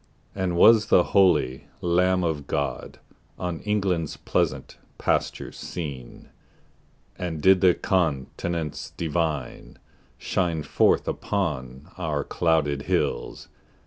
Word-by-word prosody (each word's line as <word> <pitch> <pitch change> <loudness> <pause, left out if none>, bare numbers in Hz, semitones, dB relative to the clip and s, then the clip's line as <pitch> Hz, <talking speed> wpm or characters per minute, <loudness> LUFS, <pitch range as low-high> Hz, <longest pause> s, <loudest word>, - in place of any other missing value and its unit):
And 95 -3 -2
was 110 +3 +6
the 90 - +5
holy 90 -9 +3
Lamb 90 +1 +2
of 75 -4 -2
God 70 0 -3 0.4
On 90 -3 -3
England's 95 -6 -1
pleasant 65 - -2 0.2
pastures - - -1
seen? 70 -8 -7 0.9
And 85 -3 -3
did 95 +3 +5
the 90 -2 +5
Countenance 80 -1 -2
Divine 80 -4 -3 0.4
Shine 85 -4 -1
forth - - +2
upon 75 -5 -3
our 75 -5 -1
clouded 75 -4 0
hills? - - -1
85 Hz, 100 wpm, -25 LUFS, 75-90 Hz, 0.9 s, was